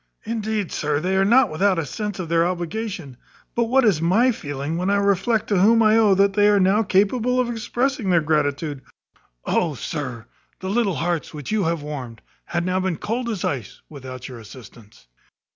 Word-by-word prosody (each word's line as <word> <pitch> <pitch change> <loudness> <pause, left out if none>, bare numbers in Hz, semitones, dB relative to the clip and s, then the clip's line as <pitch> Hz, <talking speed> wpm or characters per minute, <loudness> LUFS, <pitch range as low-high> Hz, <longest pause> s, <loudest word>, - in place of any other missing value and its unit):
Indeed, 220 -3 -3
sir, 150 -1 -1
they 185 +4 -1
are 190 - +3
not 235 +1 +4
without 190 +4 +2
a 165 - -1
sense 210 - -5
of 180 -3 -4
their 165 0 +2
obligation; 175 - -4 0.4
but 235 - +1
what 260 +2 +3
is 185 -8 +3
my 215 +10 +3
feeling 145 - -4
when 180 +3 -1
I 200 - +3
reflect 200 +3 +1
to 200 -3 +2
whom 225 +4 +5
I 215 0 +5
owe 215 -3 +5
that 195 +1 +3
they 205 +1 +4
are 205 -1 +4
now 195 +3 +3
capable 225 +5 +1
of 245 -1 0
expressing 240 0 -1
their 175 -2 +4
gratitude. 150 -2 -1 0.6
Oh, 160 -4 0
sir, 125 -5 -5 0.3
the 190 0 -4
little 210 -5 +1
hearts 165 -1 -2
which 150 +3 -6
you 215 -4 +1
have 165 -2 -1
warmed 130 -7 -7 0.2
had 170 0 -2
now 185 0 0
been 185 -3 -1
cold 235 +3 -3
as 210 -6 -3
ice 125 -8 -4
without 130 -4 -9
your 125 -3 -9
assistance." 110 - -14
185 Hz, 195 wpm, -22 LUFS, 150-215 Hz, 0.6 s, whom